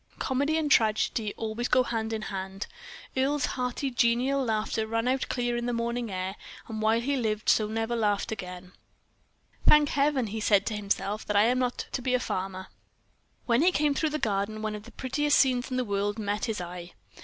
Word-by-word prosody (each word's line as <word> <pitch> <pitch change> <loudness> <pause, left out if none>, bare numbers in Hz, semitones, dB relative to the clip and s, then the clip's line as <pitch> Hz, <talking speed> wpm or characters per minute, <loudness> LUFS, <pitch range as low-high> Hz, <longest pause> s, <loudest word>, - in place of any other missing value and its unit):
Comedy 285 +4 0
and 305 -2 0
tragedy 220 -1 +2
always 225 +2 -2
go 255 0 +4
hand 225 -2 -2
in 220 -1 -3
hand. 190 +1 -5 0.5
Earle's 270 +1 +1
hearty, 255 +2 -2
genial 245 +3 +2
laugh 220 -2 -1
rang 225 +2 -1
out 260 +1 0
clear 240 -1 0
on 240 0 -2
the 245 - 0
morning 235 0 -2
air, 185 +1 -3 0.3
and 220 -1 -5
while 220 +1 +3
he 280 +4 0
lived 220 -4 +1
he 215 - +1
never 225 +2 -2
so 235 - -1
laughed 210 +1 +1
again. 180 -3 -7 1.0
"Thank 300 -1 +7
Heaven!" 280 -3 +2
he 220 +1 -4
said 205 -2 +3
to 220 - -2
himself, 205 0 -2
"that 210 - -1
I 205 - +6
am 250 +3 +3
not 250 -1 -1
to 255 - -2
be 255 0 +1
a - - +2
farmer." 185 -4 -3
Then - - -35 0.7
when 235 +2 +3
he 360 +3 +5
came 295 -3 +2
through 315 +3 0
the 305 - -2
garden, 215 -2 -1
one 215 -1 -1
of 210 0 -7
the - - -12
prettiest 290 +3 +1
scenes 255 -1 +3
in 255 - -2
the 255 - 0
world 205 0 -1
met 205 -1 -1
his 220 -3 -2
eye. 175 0 -7
230 Hz, 210 wpm, -28 LUFS, 210-255 Hz, 1.0 s, Thank